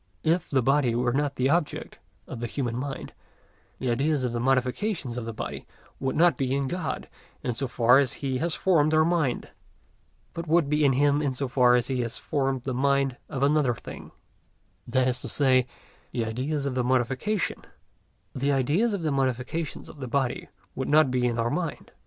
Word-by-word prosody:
If 165 +2 +1
the 135 -3 +2
body 135 -2 +2
were 120 0 +1
not 140 0 0
the 130 +2 +1
object 165 -2 -1 0.3
of - - -7
the 120 - -3
human 120 -1 -3
mind, 135 +2 -5 0.6
the 130 -2 -1
ideas 140 +3 +1
of 125 -2 -1
the 120 - -1
modifications 130 - 0
of 120 -2 -4
the 115 - -4
body 110 - -6 0.3
would 135 -1 -1
not 170 +2 +4
be 135 -1 0
in 140 -1 0
God, 175 0 -3 0.4
in 125 - -1
so 135 +4 -2
far 120 +2 +5
as 135 -4 +1
He 130 -2 -2
has 165 0 0
formed 155 -4 +3
our 155 0 +5
mind, 165 -7 0 0.8
but 170 0 -5
would 160 -2 +3
be 150 0 +2
in 140 -2 +4
Him 145 +2 +3
in 140 -3 -1
so 135 +1 -2
far 125 -1 +4
as 120 -1 +2
He 130 -1 -2
has 115 -1 -3
formed 135 -3 -1
the 130 - -2
mind 135 0 +1
of 135 -3 -2
another 140 -4 +3
thing; - - -10 0.8
that 130 +1 +2
is 125 0 0
to - - -5
say, 130 -3 +3 0.4
the 115 - -1
ideas 135 +6 -2
of 140 - -1
the 125 -1 0
modifications 130 - 0 0.7
of 145 - -1
the 130 - -5
body 130 0 -1 0.2
would 130 - -3
not 150 -2 +5
be 125 -1 +1
in 120 -1 -1
our 115 0 0
mind. 175 -3 -3
135 Hz, 185 wpm, -26 LUFS, 125-150 Hz, 0.8 s, far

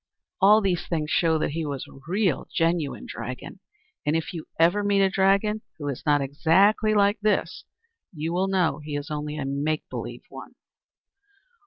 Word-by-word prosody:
All 210 +3 +7
these 185 -4 -1
things 155 -3 -2
show 165 -2 +3
that 155 - -1
he 165 +2 -3
was 140 -3 -4
a - - -15
real, 185 -4 0
genuine 165 -8 0
dragon, 125 - -7 0.4
and 150 +1 +1
if 165 +3 -2
you 165 -3 -7
ever 175 +5 +4
meet 200 -1 +3
a 190 - +2
dragon 200 +3 +2 0.2
who 145 -2 -5
is 135 - -4
not 145 -1 +4
exactly 190 +10 +3
like 205 +1 +3
this, 210 0 0 0.5
you 160 0 -4
will 185 +2 +1
know 185 -5 +1
he 150 -1 -5
is 145 +1 -5
only 150 0 -4
a 145 - -3
make 145 +3 -2
believe - - -6
one. - - -11
165 Hz, 175 wpm, -25 LUFS, 150-195 Hz, 0.5 s, All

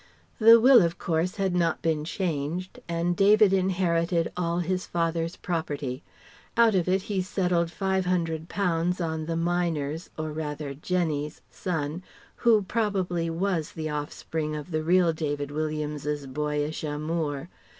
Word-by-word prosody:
The 230 +1 +9
will, 250 0 +8
of 170 -1 0
course, 170 +1 -1
had 195 -3 0
not 175 -2 +1
been 160 -2 +1
changed, 170 +1 -3
and 170 +1 0
David 205 +1 +5
inherited 175 -3 +1
all 170 -1 -1
his 180 +1 -1
"father's" 165 0 -1
property. 145 -6 -3 0.6
Out 230 -2 +6
of 185 -3 +1
it 190 +1 +2
he 200 -3 -1
settled 180 -2 0
£500 180 -1 0
on 160 -2 -2
the 165 - -1
miner's 165 -2 -1
or 155 0 -3
rather 150 -2 -4
Jenny's 155 -1 -2
son 160 -2 -3 0.4
who 225 -3 +4
probably 185 -5 -1
was 165 -1 -1
the 155 -1 -4
offspring 150 +1 -3
of 150 +3 -7
the 155 -1 0
real 175 +1 +3
David 145 -2 -3
Williams's 150 -1 -2
boyish 150 +3 -2
amour. 150 -1 -2
165 Hz, 135 wpm, -27 LUFS, 155-185 Hz, 0.6 s, The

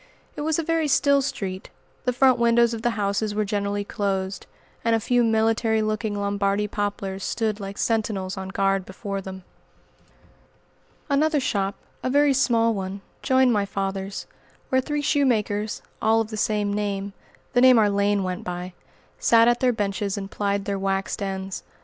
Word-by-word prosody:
It - - -5
was 310 +1 0
a 330 - 0
very 325 -1 +1
still 280 0 +4
street; 190 -8 -4 0.4
the 250 - +2
front 255 0 +4
windows 235 0 +4
of 225 - -4
the 235 -1 0
houses 205 +1 -1
were 215 0 +1
generally 205 0 -1
closed, 195 -1 -3 0.4
and 230 0 +3
a - - +1
few 245 +2 +2
military 225 0 +2
looking 215 0 -1
Lombardy 200 0 0
poplars 200 -2 -3
stood 220 -2 -1
like 195 0 -6
sentinels 210 -4 -1
on 190 -1 -6
guard 195 0 +1
before 195 +1 -5
them. 190 -1 -8 1.6
Another 300 +1 +2
shop 200 -6 -1 0.3
a - - -1
very 285 +1 +4
small 230 -4 +3
one 195 -1 -4 0.2
joined 260 -1 +3
my 205 -2 +2
father's, 195 0 -3 0.4
where 260 0 +3
three 295 +2 -2
shoemakers, 220 -8 +1 0.2
all 220 +1 +3
of 225 0 -2
the - - -4
same 210 -1 0
name 200 -1 -2 0.4
the 245 - +4
name 255 -1 +7
our 215 -2 +5
lane 200 0 +1
went 185 -1 -3
by 180 0 -5 0.5
sat 230 0 +5
at 240 0 +3
their 255 -1 +3
benches 205 -2 -2
and 195 -1 -6
plied 200 -1 -1
their 200 -1 -2
"waxed 195 +1 -1
ends." 190 -1 -4
210 Hz, 170 wpm, -24 LUFS, 195-235 Hz, 1.6 s, name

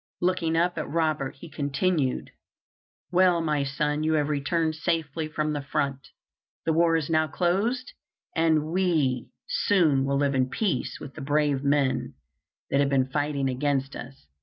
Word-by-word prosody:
Looking 175 -2 +1
up 175 +1 +1
at - - -4
Robert, 155 -4 0
he 140 - -11
continued: 145 -1 -1 0.8
"Well, 180 -1 +4
my 150 -3 0
son, 150 +2 -1
you 160 +1 +1
have 150 -1 +1
returned 155 +3 0
safely 160 -1 -2
from 155 0 -2
the 145 - -2
front. 140 -1 -2 0.6
The 160 - +2
war 165 0 +3
is 160 -3 0
now 155 -1 +2
closed, 200 - 0 0.4
and 160 -2 +2
we 160 -9 +1 0.2
soon 185 - +3
will 140 0 +1
live 140 0 +1
in 130 -1 +1
peace 170 - -1
with 140 - -9
the - - -9
brave 145 -1 +1
men 140 -2 +1 0.6
that 140 - +3
have 140 -1 +3
been 130 -1 +2
fighting 145 -1 0
against 135 +1 -1
us. 135 +3 -10
150 Hz, 160 wpm, -26 LUFS, 140-165 Hz, 0.8 s, Well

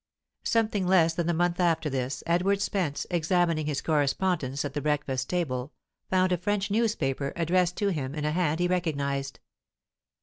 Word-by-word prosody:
Something 215 -4 +1
less 170 -3 +4
than 170 0 -1
a - - +2
month 175 +1 +1
after 165 -3 +2
this, 130 -2 -3
Edward 180 +4 +2
Spence, 185 -7 -1
examining 170 -2 +1
his 145 -2 -2
correspondence 145 -2 0
at 140 - -4
the 145 - -2
breakfast 140 -4 -1
table, 140 -6 -2 0.4
found 185 0 +2
a 180 - +2
French 200 +2 -1
newspaper, 155 - 0
addressed 175 +1 +1
to 205 - +1
him 145 -6 -3
in 150 -1 -3
a 150 - +1
hand 165 -1 0
he 175 - +2
recognized. 140 -6 -1
165 Hz, 165 wpm, -27 LUFS, 145-180 Hz, 0.4 s, less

